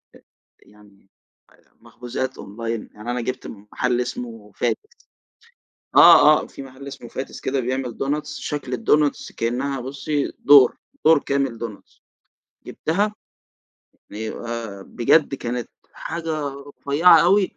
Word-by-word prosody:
آآ، - - -18 0.4
يعني 100 -2 -22 0.7
مخبوزات 125 +2 -5
أونلاين 115 +2 -5
يعني 105 +3 -6
أنا 125 0 -2
جبت 125 +2 -4
من 100 -1 -11
محل 125 -1 0
اسمه 115 -4 -6
Fati’s 430 +2 -2 1.0
آه، 155 -3 +8
آه، - - -9
في - - -10
محل 135 +1 -11
اسمه 120 -3 -9
Fati’s 135 - -6
كده 135 +1 -1
بيعمل 130 -1 -3
دونتس 145 +2 -2
شكل 145 -3 -4
الدونتس 145 +5 +1
كأنّها 130 +4 -2
بُصّي 140 +3 -2
دور 140 -3 +7 0.3
دور 160 -1 +7
كامل 140 -4 -1
دونتس 110 -3 -9 0.7
جبتها، 205 +6 -1 1.0
بيبقى 110 -1 -6
بجد 135 +7 +2
كانت 120 -2 -4 0.2
حاجة 160 -3 -4
رفيعة 145 +4 +3
أوي، 195 +1 +3
130 Hz, 120 wpm, -22 LUFS, 115-145 Hz, 1.0 s, آه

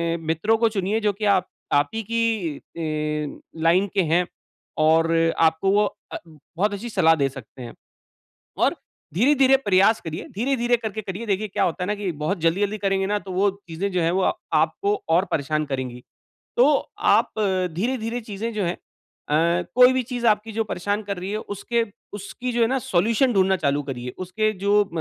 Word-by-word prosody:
अ, - - -3
मित्रों 185 +8 +2
को 230 0 +3
चुनिए 205 +1 -1
जो 210 -1 +1
की 210 +2 -4
आप 185 -1 -1 0.3
आप 145 0 +3
ही 225 - -2
की 225 -10 0
अ, 150 -2 -4 0.2
लाइन 180 +4 +4
के 195 - +4
हैं। 180 +1 +3 0.5
और 160 +1 +4 0.3
आपको 160 +4 +3
वो 210 +1 +4 0.3
अ, - - -2
बहुत 165 +6 -3
अच्छी 215 +4 -5
सलाह 165 -6 +4
दे 140 -3 +1
सकते 130 -1 -12
हैं। 120 - -8 0.9
और - - +2 0.4
धीरे-धीरे 270 - +5
प्रयास 205 -3 +3
करिए, 160 -1 -6
धीरे-धीरे 240 +1 +1
करके 220 -2 -5
करिए 200 +3 -6
देखिए 210 +1 -1
क्या 195 - 0
होता 175 +1 -2
है - - -4
ना, 210 - +1
कि 200 -3 -3
बहुत 155 +6 -2
जल्दी-जल्दी 200 +6 +1
करेंगे 195 -1 0
ना 205 +1 0
तो 195 -2 -9
वो 195 +2 +2 0.2
चीज़ें 175 +5 -3
जो 180 - +1
हैं 165 - +2
वो 190 +1 +1
अ, - - +3 0.2
आपको 405 +1 +1
और 170 +3 +3
परेशान 155 +1 0
करेंगी। 130 -3 -4 0.5
तो 245 - +6 0.4
आप - - +3 0.4
धीरे-धीरे 230 +4 -2
चीज़ें 220 +1 -5
जो 210 - -1
हैं 175 +1 -1 0.5
अ, 170 +4 +2
कोई 250 +1 +7
भी 260 0 +1
चीज़ 245 0 -3
आपकी 215 0 +2
जो 225 +1 -1
परेशान 205 +1 -2
कर 200 -1 -4
रही 185 +2 -5
है 215 - -1 0.2
उसके 235 +4 -1 0.3
उसकी 210 +5 -5
जो 240 - 0
है - - +5
ना 265 +2 +1
सॉल्यूशन 230 +5 +2
ढूँढ़ना 190 -1 +3
चालू 145 -4 0
करिए। 125 -3 -5
उसके 215 +4 -1
जो 205 +1 +5
अ, - - -16
195 Hz, 190 wpm, -23 LUFS, 165-220 Hz, 0.9 s, कोई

